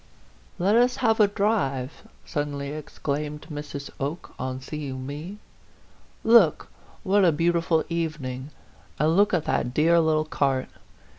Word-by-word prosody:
" - - -30
Let 195 +4 +2
us 245 +1 +4
have 225 0 +3
a 210 - +6
drive 195 - -1
!" - - -31
suddenly 145 -2 -3
exclaimed 150 0 -4
Mrs. 145 -1 -6
Oke, 145 +5 -4
on 130 0 -3
seeing 130 -2 -6
me. 155 +8 -6 0.4
" - - -31 0.2
Look, 165 -8 0 0.3
what 200 +1 +3
a 175 - +6
beau 165 +3 +2
tiful 165 -1 +1
evening 150 -6 -3 0.5
and 155 +2 +2
look 205 +2 +4
at 175 -5 0
that 125 0 -1
dear 165 +2 +4
little 155 -1 +2
cart 135 -4 0
155 Hz, 150 wpm, -25 LUFS, 140-175 Hz, 0.5 s, a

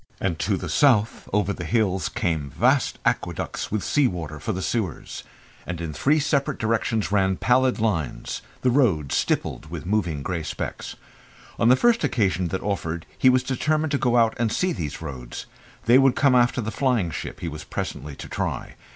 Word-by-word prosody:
And 85 -4 -1
to 100 -1 +1
the 90 - -5
south 110 - +2
over 100 -1 +1
the 85 - -6
hills 95 -1 +1
came 80 -5 -1
vast - - +2
aqueducts - - -2
with 105 -2 -1
sea 145 -3 +3
water 80 -6 -5
for 110 - -3
the 95 -2 -3
sewers, 105 -8 -3 0.4
and 90 -2 -4
in 85 -2 -4
three 145 - +2
separate 140 -2 0
directions 110 -1 0
ran 95 -2 +2
pallid 130 +1 +3
lines 90 - -2 0.2
the 125 - +3
roads, 95 - +2
stippled 80 - -1
with 80 -2 -6
moving 85 -7 -1
grey 85 0 -2
specks. - - -5 0.6
On 115 - +4
the 125 - +7
first 235 - +3
occasion 95 -5 +1
that 95 +3 -3
offered 85 -5 -2
he 130 - +5
was 130 0 +3
determined 155 +3 0
to 140 - +1
go 120 -1 +2
out 115 -1 +4
and 115 -2 +1
see 180 +7 +1
these 75 - -5
roads. 65 -5 -7 0.4
That 120 +4 +6
would 135 -1 +4
come 140 -3 +4
after 125 0 +3
the 110 0 -3
flying 120 -11 +1
ship - - -6
he - - -3
was 75 -1 -6
presently 75 +1 -5
to - - -8
try. - - -3
105 Hz, 185 wpm, -24 LUFS, 85-125 Hz, 0.6 s, the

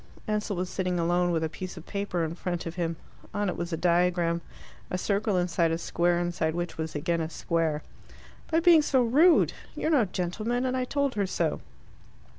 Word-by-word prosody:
Ansell 210 -1 -1
was 180 +1 -2
sitting 185 -2 -1
alone 175 +1 +2
with 165 -2 0
a - - +1
piece 180 +4 -7
of 165 - -9
paper 200 -4 -2
in 160 0 -2
front 175 0 -3
of 165 - -4
him. 170 -2 -2 0.4
On 205 -1 0
it - - -2
was 175 0 -4
a 165 - -1
diagram 175 0 +2 0.5
a 180 - -1
circle 200 +1 0
inside 175 -1 +2
a 165 - 0
square, 170 +1 +1
inside 175 -2 -1
which 175 -1 -3
was 160 -1 -4
again 165 +3 0
a 160 - -2
square. 160 -2 -1 0.7
"By 325 +1 +2
being 335 -2 +7
so 265 -4 +2
rude. 305 +9 +5 0.2
You're 315 - -1
no 270 -8 +4
gentleman, 215 +7 -2
and 255 0 0
I 255 -1 0
told 280 0 0
her 200 -2 0
so." - - -1
180 Hz, 200 wpm, -28 LUFS, 170-210 Hz, 0.7 s, being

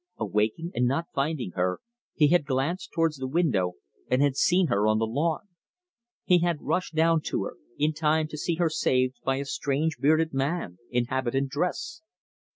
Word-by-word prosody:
Awaking, 110 - -1
and 125 0 +1
not 165 +7 -1
finding 135 - -1
her, 90 +1 -1 0.4
he 150 -2 +4
had 170 -4 +3
glanced 140 +7 -1
towards 165 -3 +1
the 130 0 -4
window, 130 - +1 0.4
and 125 - +2
had 140 -2 +2
seen 180 +5 +3
her 105 -7 +1
on 110 0 +3
the 115 - +1
lawn. 155 - -1 0.8
He 180 -1 +5
had 170 -2 0
rushed 180 -3 -1
down 165 0 +3
to - - -1
her, - - -6 0.2
in 150 +2 +1
time 155 0 +1
to 150 - -7
see 170 +2 -1
her 165 -1 +1
saved 130 -4 +1
by 135 - +1
a 140 +1 -3
strange 145 +3 -1
bearded 155 +2 +3
man 135 - -2
in 120 0 +1
habitant 130 +2 -1
dress. 180 - -2
145 Hz, 180 wpm, -27 LUFS, 130-165 Hz, 0.8 s, He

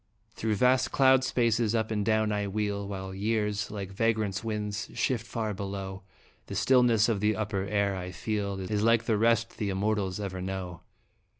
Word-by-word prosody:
Through 110 -1 -1
vast 130 +4 +3
cloud 130 -1 +5
spaces, 115 -3 +1
up 110 -1 0
and 105 -2 0
down 110 0 +2
I 105 -1 -1
wheel, 100 0 -2
While 95 -1 -5
years, 105 +1 -1
like 100 -2 -6
vagrant 110 -1 0
winds, 105 -1 -3
shift 120 -3 0
far 110 -3 -2
below? 95 -1 -5 0.5
The - - -6
stillness 120 -4 +4
of 115 -4 0
the 105 +1 +2
upper 100 -3 -2
air 100 -1 0
I 90 -1 -5
feel 100 +1 -3
Is 100 +2 -2
like 115 +1 +4
the 110 - +1
rest 115 0 +2
the 105 -3 -1
immortals 100 0 -1
ever 95 -3 -4
know. 95 -2 -5
105 Hz, 175 wpm, -28 LUFS, 100-115 Hz, 0.5 s, cloud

